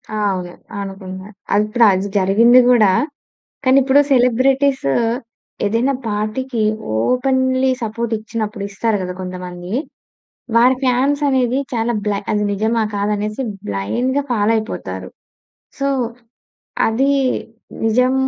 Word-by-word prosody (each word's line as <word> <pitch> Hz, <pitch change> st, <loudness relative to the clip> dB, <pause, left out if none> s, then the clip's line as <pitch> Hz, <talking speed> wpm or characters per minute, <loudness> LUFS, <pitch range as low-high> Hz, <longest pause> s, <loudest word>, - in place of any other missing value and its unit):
ఆ! -, -, -2 dB, 0.2 s
అవును. 180 Hz, -1 st, -5 dB, 0.3 s
అనుకుంటున్నారు. 190 Hz, 0 st, -8 dB, 0.2 s
అది 205 Hz, +1 st, +4 dB
ఇప్పుడు 230 Hz, +2 st, +3 dB
అది 190 Hz, +1 st, 0 dB
జరిగింది 220 Hz, +6 st, +5 dB
కూడా, 215 Hz, -6 st, +5 dB, 0.7 s
కానీ 260 Hz, 0 st, +4 dB
ఇప్పుడు 270 Hz, +2 st, +4 dB
సెలబ్రిటీసూ 260 Hz, -, +2 dB, 0.7 s
ఏదైనా 230 Hz, +6 st, +1 dB, 0.2 s
పార్టీకి 220 Hz, +4 st, -2 dB, 0.4 s
ఓపెన్‌లీ 260 Hz, -, +1 dB
సపోర్ట్ 230 Hz, +1 st, -3 dB
ఇచ్చినప్పుడు, 215 Hz, -1 st, -4 dB
ఇస్తారు 210 Hz, +2 st, 0 dB
కదా! 180 Hz, 0 st, -4 dB
కొంతమందీ. 180 Hz, 0 st, -7 dB, 0.8 s
వారి 245 Hz, +3 st, +5 dB
ఫాన్స్ 265 Hz, +3 st, +2 dB
అనేది 260 Hz, -1 st, +1 dB
చాలా 230 Hz, 0 st, 0 dB
బ్లై 205 Hz, -1 st, 0 dB
అది 210 Hz, -1 st, +1 dB
నిజమా 220 Hz, +3 st, 0 dB
కాదా 205 Hz, +1 st, 0 dB
అనేసి 210 Hz, +4 st, -3 dB, 0.3 s
బ్లైండ్‌గా 240 Hz, -, -1 dB
ఫాలో 215 Hz, -2 st, +2 dB
అయిపోతారు. 220 Hz, 0 st, -5 dB, 0.7 s
సో, 275 Hz, -, 0 dB, 1.0 s
అదీ 265 Hz, +5 st, +2 dB, 0.7 s
నిజం 250 Hz, +3 st, +3 dB
225 Hz, 110 wpm, -18 LUFS, 200-255 Hz, 1.0 s, జరిగింది